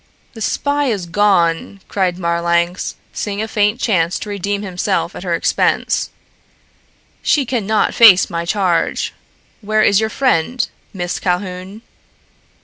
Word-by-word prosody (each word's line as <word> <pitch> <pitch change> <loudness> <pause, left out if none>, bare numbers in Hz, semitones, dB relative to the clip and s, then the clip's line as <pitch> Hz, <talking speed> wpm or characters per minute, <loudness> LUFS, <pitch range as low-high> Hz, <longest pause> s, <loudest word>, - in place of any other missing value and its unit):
"The 225 - -10
spy 285 +6 0
is 210 -9 -1
gone," 175 0 +1
cried 185 -3 -1
Marlanx, 170 +1 0 0.2
seeing 205 -1 -3
a 220 - -2
faint 210 +1 +1
chance 180 -9 +1
to 210 - -7
redeem 200 +1 -2
himself 180 -3 -2
at - - -7
her - - -1
expense. - - 0 1.1
"She 295 -2 +2
can 230 -5 -2
not 220 0 +1
face 210 -6 +7
my 170 -2 -3
charge. 180 -1 0 0.5
Where 215 +1 +1
is 200 -1 +4
your 220 0 0
friend, 245 -1 +1 0.2
Miss 175 -2 -3
Calhoun?" 185 +3 -3
200 Hz, 135 wpm, -17 LUFS, 175-220 Hz, 1.1 s, face